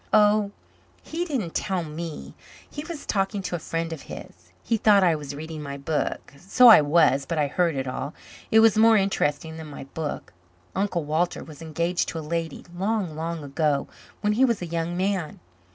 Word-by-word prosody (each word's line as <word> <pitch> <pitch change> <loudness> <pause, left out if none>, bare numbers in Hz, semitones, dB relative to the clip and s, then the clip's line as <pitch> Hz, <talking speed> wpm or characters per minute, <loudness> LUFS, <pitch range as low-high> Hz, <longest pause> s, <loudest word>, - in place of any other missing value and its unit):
"Oh, 210 -1 +4 0.5
he 340 +2 -3
didn't 245 - -3
tell 185 -3 -1
me. 160 0 -7 0.3
He 295 - -7
was 330 -3 -7
talking 195 0 -1
to 180 - -3
a - - -3
friend 165 +1 -3
of 155 - -8
his. 90 +1 -11
He 230 - +1
thought 205 -2 +5
I 175 -2 +4
was 145 -2 -5
reading 155 +1 -7
my 140 -1 -6
book. 145 +1 -3
So 240 - +6
I 220 - +10
was 145 -2 +3
but 170 - -2
I 150 - +3
heard 165 +2 +1
it 135 -1 -2
all. 135 +3 -4 0.3
It 220 - +6
was 220 -2 +5
more 225 0 +7
interesting 160 -5 0
than 160 -1 -8
my 145 - -8
book. 145 -2 -6 0.4
Uncle 190 -5 -1
Walter 160 +4 0
was 155 -2 -12
engaged 170 +2 -1
to - - -5
a 160 - -5
lady, 165 -3 -3
long, 195 -3 -1
long 165 0 -4
ago, 145 0 0 0.3
when 210 0 +2
he 245 +5 +3
was 235 -5 +3
a 175 - -4
young 170 +1 -3
man. 190 -4 -1
170 Hz, 195 wpm, -25 LUFS, 150-200 Hz, 0.5 s, I